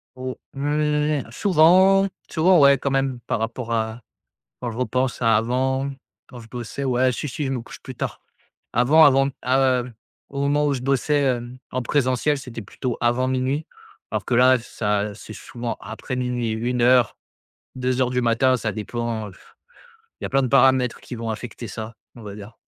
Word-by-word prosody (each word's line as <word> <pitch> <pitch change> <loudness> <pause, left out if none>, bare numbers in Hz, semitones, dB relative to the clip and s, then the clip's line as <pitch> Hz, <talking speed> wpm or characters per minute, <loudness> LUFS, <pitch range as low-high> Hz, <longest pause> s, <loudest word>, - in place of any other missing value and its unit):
Au 130 0 -5 0.2
mmh, 150 -1 0
souvent 190 - +5 0.2
souvent. 175 +1 +4
Ouais 140 -1 +6
quand 140 - -2
même 135 -2 0
par - - 0
rapport 115 +1 -3
à 110 +1 -2 0.6
quand 120 - -3
je 110 - -9
repense 125 0 -1
à 115 -2 +4
avant, 130 +4 0 0.4
quand 125 - -11
je 115 - -15
bossais. 120 +2 -6
Ouais, 130 -1 +2
si, 150 - -4
si, 145 +3 -4
je 135 - -2
me 130 -3 -2
couche 115 - -12
plus 130 - -9
tard. - - -5 0.5
Avant 145 +7 +6
avant, 135 0 +4 0.2
heu, 130 -1 +2 0.4
au 140 0 -4
moment 145 +1 +2
où 145 - +1
je 130 - -4
bossais, 140 +2 +1
hem, 125 -1 -1
en 130 - -1
présentiel, 135 +3 +1
c'était 125 -4 -8
plutôt 120 +4 -4
avant 120 +2 +2
00:00, 130 +4 -1 0.5
alors - - -2
que - - -2
là 130 +1 +6
ça 105 -3 -2
c'est 110 +1 -10
souvent 120 +1 -6
après 110 +5 -6
00:00-1:00-2:00 125 +1 -1
du 125 0 0
matin, 120 +2 +3
ça 110 -2 -2
dépend, 110 +1 -4
heu, - - -14
f - - -21 0.7
il - - -6
y - - 0
a - - -7
plein 135 +1 +3
de 130 - 0
paramètres 130 -1 +3
qui - - -8
vont 115 0 -5
affecter 115 +1 -6
ça, 110 +3 -7 0.2
on 120 - -11
va 100 -2 -8
dire. 105 +2 -11
125 Hz, 180 wpm, -23 LUFS, 115-135 Hz, 0.7 s, Ouais